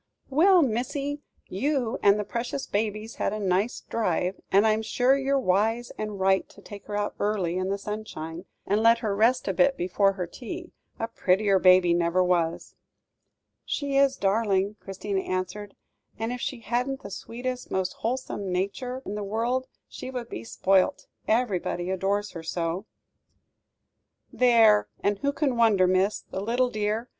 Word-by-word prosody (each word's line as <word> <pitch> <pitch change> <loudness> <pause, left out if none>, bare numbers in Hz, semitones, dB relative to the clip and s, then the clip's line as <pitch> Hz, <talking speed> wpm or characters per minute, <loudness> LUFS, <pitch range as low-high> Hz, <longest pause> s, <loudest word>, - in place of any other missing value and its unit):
"Well, 350 +5 +6
missy, 280 +4 -2 0.3
you 250 +3 -1
and 200 0 +5
the - - 0
precious 240 +6 -4
baby's 215 +1 -3
had - - -1
a 215 - -3
nice 195 +3 0
drive; 185 -4 -1
and 200 +3 +5
I'm 215 0 +3
sure 245 +4 +2
you're 275 0 +1
wise 225 +1 +1
and 210 -2 -5
right 190 0 +2
to - - -17
take 200 0 -11
her 205 -1 -3
out 205 0 -1
early, 200 -5 0
in 185 +1 -1
the 200 - 0
sunshine, 195 -5 -6 0.2
and 205 +2 +1
let 230 +1 +6
her 200 -2 0
rest 235 +5 +2
a - - +1
bit 270 0 +3
before 195 +2 +2
her 185 -2 -3
tea 335 - -8 0.3
a 225 - -2
prettier 195 -2 +2
baby 185 -1 +6
never 170 +1 +2
was." 170 -2 0 0.9
"She 280 -1 -2
is 275 -1 +4
a - - -31
darling," 200 0 +1
Christina 195 0 -3
answered, 185 +3 -4 0.4
"and 225 +2 -2
if 250 - -6
she 255 -4 -4
hadn't 250 +4 -2
the 200 - -8
sweetest, 250 +5 -5
most 185 -1 -1
wholesome 225 -5 -3
nature 245 +8 -3
in 200 - -4
the 210 - -4
world, 235 +5 -1 0.2
she - - -8
would 250 -2 -5
be 110 - -6
spoilt, 190 +10 +1 0.2
everybody 190 -6 0
adores 200 +2 -1
her 170 - -7
so!" 165 +4 -3 1.5
"There! 225 -4 +5 0.2
and 200 0 +1
who 280 - +1
can 285 -3 0
wonder, 220 -5 +4
miss. 185 +3 +2
The 190 - -6
little 245 +4 +1
dear! 215 +2 -1
210 Hz, 165 wpm, -26 LUFS, 190-245 Hz, 1.5 s, Well